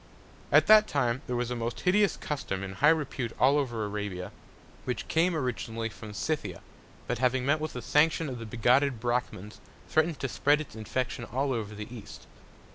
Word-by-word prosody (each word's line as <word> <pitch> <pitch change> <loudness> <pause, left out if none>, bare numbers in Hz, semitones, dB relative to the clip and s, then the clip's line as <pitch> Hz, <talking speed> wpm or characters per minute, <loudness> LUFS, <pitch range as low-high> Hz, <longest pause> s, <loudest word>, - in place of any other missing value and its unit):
At - - +6
that 215 0 +7
Time 130 -3 0
there 125 - -2
was 120 0 -1
a - - -1
most 115 0 -4
hideous 200 +2 +3
Custom 100 -10 -4
in 95 -1 -5
high 145 +10 +4
Repute 140 -7 0
all 140 +3 +5
over 120 -6 -2
Arabia, 105 -3 -4 0.5
which 125 - -3
came 165 +2 +2
originally 115 -5 -3
from 110 0 -10
Scythia; 155 +7 -3 0.4
but - - -2
having 125 0 +1
met 150 +3 +2
with 155 0 -4
the 125 - -6
Sanction 160 +2 +3
of 125 -3 -5
the 115 - -7
bigotted 125 +3 +2
Brachmans, 120 -4 -3 0.3
threatn'd 155 0 +1
to 135 - 0
spread 145 +4 +2
its 155 -7 -8
Infection 120 +3 -3
all 135 +4 -1
over 110 -3 -4
the 105 +4 -8
East. 105 -3 -11
125 Hz, 185 wpm, -29 LUFS, 115-150 Hz, 0.5 s, that